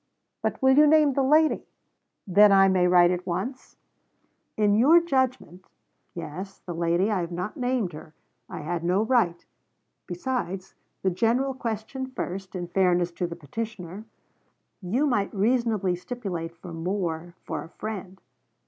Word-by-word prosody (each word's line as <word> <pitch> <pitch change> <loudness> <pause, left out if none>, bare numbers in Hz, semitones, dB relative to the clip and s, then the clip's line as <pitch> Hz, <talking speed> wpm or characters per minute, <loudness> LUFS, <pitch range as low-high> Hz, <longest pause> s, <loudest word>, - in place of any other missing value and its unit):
But - - -2
will 265 0 +6
you 300 - +7
name 305 -2 +5
the 275 - +1
lady?' 305 +4 +3 0.6
'Then 205 +2 +6
I 195 0 +6
may 185 -1 +3
write 175 0 +5
at 180 +1 -3
once? 200 +10 -4 0.8
In 210 -1 +3
your 275 +11 +6
judgement.... 260 - -1 0.5
Yes, 175 +4 -7
the 175 - -5
lady. 170 +5 +1
I 205 - +1
have 170 0 -5
not 180 +4 -4
named 245 -8 -1
her. 155 +1 -11 0.3
I - - -6
had 170 +2 -3
no 180 +4 +2
right. 220 -8 +1 0.6
Besides, 190 -1 -4 0.3
the 190 - +2
general 240 +8 +1
question 245 +1 -4
first, 190 -6 -6
in 175 -1 -4
fairness 180 -1 +2
to 175 +1 -3
the 170 - -7
petitioner. 190 +4 -7 0.8
You 225 +11 0
might 210 -8 0
reasonably 215 -3 +1
stipulate 180 -6 -6
for 175 0 -10
more 170 -1 -3
for 155 -3 -4
a - - -12
friend. 195 -2 -7
195 Hz, 150 wpm, -26 LUFS, 175-240 Hz, 0.8 s, you